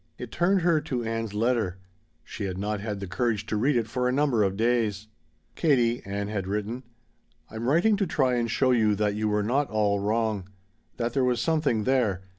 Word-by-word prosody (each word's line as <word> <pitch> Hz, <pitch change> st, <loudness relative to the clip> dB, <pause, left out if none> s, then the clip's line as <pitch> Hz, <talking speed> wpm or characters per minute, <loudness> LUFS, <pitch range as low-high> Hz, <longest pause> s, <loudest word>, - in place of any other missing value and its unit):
It 125 Hz, -3 st, -8 dB
turned 185 Hz, +2 st, +2 dB
her 165 Hz, -2 st, +3 dB
to 130 Hz, -6 st, -3 dB
Ann's 115 Hz, -2 st, -3 dB
letter; 110 Hz, -5 st, 0 dB, 0.5 s
she 100 Hz, -, -6 dB
had 95 Hz, -1 st, -4 dB
not 105 Hz, +2 st, -2 dB
had 105 Hz, -1 st, -4 dB
the 100 Hz, -, -5 dB
courage 110 Hz, +2 st, -1 dB
to 105 Hz, -, -3 dB
read 130 Hz, +7 st, +2 dB
it 115 Hz, -2 st, +1 dB
for 125 Hz, +3 st, -1 dB
a -, -, +1 dB
number 135 Hz, -4 st, +2 dB
of 95 Hz, -1 st, +1 dB
days. 110 Hz, -3 st, 0 dB, 0.5 s
"Katie," 120 Hz, -7 st, +2 dB
Ann 100 Hz, +1 st, -3 dB
had 100 Hz, -3 st, -3 dB
written, 105 Hz, +5 st, -3 dB, 0.7 s
"I'm 110 Hz, +2 st, -4 dB
writing 175 Hz, +9 st, +4 dB
to 195 Hz, -2 st, 0 dB
try 130 Hz, -5 st, +1 dB
and 120 Hz, -1 st, 0 dB
show 130 Hz, +3 st, +2 dB
you 110 Hz, -4 st, +3 dB
that 105 Hz, 0 st, 0 dB
you 105 Hz, +1 st, -1 dB
were 105 Hz, 0 st, +1 dB
not 135 Hz, +6 st, 0 dB
all 105 Hz, -2 st, +1 dB
wrong. 105 Hz, -2 st, -1 dB, 0.5 s
That 120 Hz, 0 st, -2 dB
there 135 Hz, -, +1 dB
was 125 Hz, -1 st, +1 dB
something 145 Hz, -6 st, +1 dB
there. 110 Hz, -7 st, +1 dB
115 Hz, 205 wpm, -26 LUFS, 105-125 Hz, 0.7 s, writing